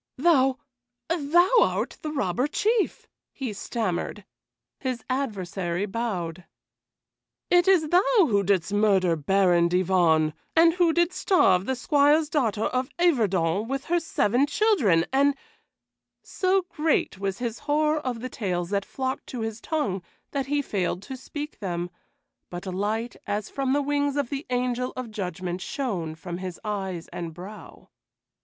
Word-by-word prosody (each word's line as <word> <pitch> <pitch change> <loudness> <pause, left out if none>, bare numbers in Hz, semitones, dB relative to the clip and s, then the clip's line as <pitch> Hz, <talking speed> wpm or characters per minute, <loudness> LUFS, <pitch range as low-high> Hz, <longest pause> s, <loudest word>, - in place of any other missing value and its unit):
"Thou 270 -3 +4 0.6
thou 345 +4 +3
art - - 0
the 305 - -4
Robber 250 - 0
Chief," 430 +6 0 0.2
he 255 -6 -5
stammered. 210 -2 -3 0.5
His 255 -4 -3
adversary 195 -8 -2
bowed. 190 -6 -3 1.1
"It 355 0 +5
is 345 -6 +4
thou 355 +3 +5 0.2
who 245 - +4
didst 195 -1 +1
murder 195 -5 +3
Baron 175 +1 +3
Divonne, 170 -4 +3 0.2
and 330 0 +6
who 350 -2 +3
didst 345 +2 +1
starve 190 - +3
the 265 - 0
Squire's 290 +4 +3
daughter 225 -8 +1
of 255 0 -1
Yverton 210 - +2
with 270 +2 -3
her 345 +1 +2
seven 260 -4 +1
children, 285 - +3
and" 280 +1 +4 0.9
So 380 0 +1
great 310 - 0
was 195 -1 -2
his 235 -2 -4
horror 305 +1 +2
of 255 -5 -4
the 255 - -4
tales 180 -6 -3
that 200 -1 0
flocked 260 0 -4
to 245 - -5
his 225 0 -4
tongue 290 - -1 0.3
that 275 -2 -2
he 290 0 0
failed 190 -4 -2
to 265 - -7
speak 290 +3 -7
them, 175 -3 -3 0.6
but 175 0 -7
a 190 - -4
light 215 +5 -2
as 205 0 -2
from 270 -1 -1
the 290 0 +2
wings 285 0 0
of 280 -4 -1
the 280 +1 -4
Angel 250 0 -1
of 255 -3 -6
Judgment 185 -3 -4
shone 185 - -3
from 175 +2 -6
his 185 -2 -6
eyes 190 -5 -3
and 165 -2 -6
brow. 195 +5 -11
230 Hz, 150 wpm, -26 LUFS, 185-285 Hz, 1.1 s, and